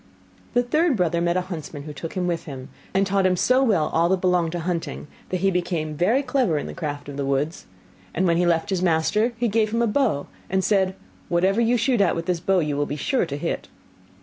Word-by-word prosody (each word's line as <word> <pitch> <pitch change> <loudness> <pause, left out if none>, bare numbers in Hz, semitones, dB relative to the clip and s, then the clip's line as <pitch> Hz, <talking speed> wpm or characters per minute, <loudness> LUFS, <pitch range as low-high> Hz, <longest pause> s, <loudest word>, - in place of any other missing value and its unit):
The 245 - +4
third 305 +2 +2
brother 170 -2 +1
met 170 +1 +1
a - - +2
huntsman, 160 -5 -7
who 150 0 -7
took 160 +3 -7
him 185 -1 -1
with 170 -2 -2
him, 135 -2 -8 0.2
and 195 +1 +2
taught 195 -1 +2
him 185 - +2
so 255 +8 +3
well 195 - +2
all 165 +1 +3
that 190 0 +2
belonged 180 -2 +1
to 175 - -2
hunting, 170 -2 -3 0.2
that 185 -1 -2
he 195 0 +3
became 170 -4 -1
very 220 - +2
clever 250 - +1
in - - -3
the - - -6
craft 145 -3 -5
of 140 -1 -7
the 140 - -1
woods; 140 +4 -1 0.4
and 185 - 0
when 170 -2 +3
he 175 0 +2
left 170 +3 +1
his 185 -2 0
master 185 +7 +2
he 240 +1 +1
gave 215 0 +1
him 230 +1 +1
a - - +4
bow, 220 - +1 0.2
and 190 0 +1
said, 190 -2 +2 0.3
'Whatever 190 +5 +2
you 235 +1 +3
shoot 240 -1 +2
at 195 - +3
with 165 0 -3
this 180 -2 0
bow 190 +3 +1
you 150 -2 -1
will 145 0 0
be 145 - -3
sure 185 - 0
to 140 - -4
hit. - - -3
180 Hz, 245 wpm, -23 LUFS, 160-210 Hz, 0.4 s, The